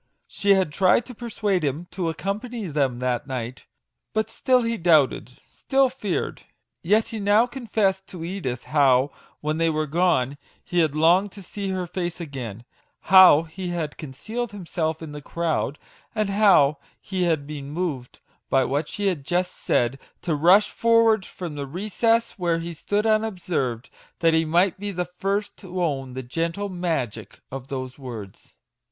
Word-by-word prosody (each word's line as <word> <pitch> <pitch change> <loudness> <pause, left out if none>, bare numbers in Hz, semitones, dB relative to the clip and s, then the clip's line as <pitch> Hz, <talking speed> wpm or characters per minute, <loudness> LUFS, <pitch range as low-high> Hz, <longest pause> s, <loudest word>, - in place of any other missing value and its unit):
She 200 0 +2
had 190 -5 +1
tried 195 +6 +3
to 250 - -9
per 240 +1 -7
suade 205 -4 0
him 150 +3 -2
to 175 -4 -2
accompany 210 +7 -4
them 140 -6 0
that 125 0 -1
night, 130 -1 -5 0.5
but 220 0 -1
still 255 +2 +2
he 230 0 0
doubted 155 - +3
still 270 -1 +1
feared. 215 -8 -3 0.4
Yet 215 +6 +2
he 225 -2 -5
now 205 +3 +4
confessed 215 -6 -1
to 170 -3 -7
Edith 165 -10 -4
how, 140 -2 +3 0.3
when 155 +1 -1
they 165 0 +3
were 155 -1 0
gone, 150 -4 +1 0.2
he 175 - -1
had 155 -3 +2
longed 175 +6 +4
to 200 - -11
see 200 +2 -5
her 185 -1 -2
face 175 0 -4
again, 125 - -6 0.5
how 185 -5 +9
he 175 +3 -7
had 170 -4 -3
concealed 205 - -5
himself 165 -4 -3
in 155 - -7
the 150 0 -7
crowd, 160 -2 -2 0.4
and 215 -2 0
how 185 -9 +5 0.2
he 185 -2 -2
had 160 -4 +1
been 140 -2 -7
moved, 150 -6 -4 0.3
by 135 -1 +3
what 145 +3 -1
she 205 - -4
had 180 -8 0
just 180 +4 0
said, 120 +3 0 0.2
to 170 - 0
rush 180 +8 +5
forward 230 -3 +3
from 175 -4 -7
the 140 -1 -5
recess 215 - 0
where 170 -2 +1
he 170 +1 -5
stood 205 +6 -1
unobserved, 180 - -1 0.3
that 165 -1 +3
he 160 0 +3
might 175 +4 +2
be 205 +1 -3
the 180 -2 -2
first 195 +4 -3
to 185 -2 -7
own 135 -5 -2
the 130 +1 -5
gentle 165 +9 -2
Magic 135 - -3
of 135 0 -6
those 130 -1 -5
words 115 -7 -9
170 Hz, 170 wpm, -24 LUFS, 145-200 Hz, 0.5 s, how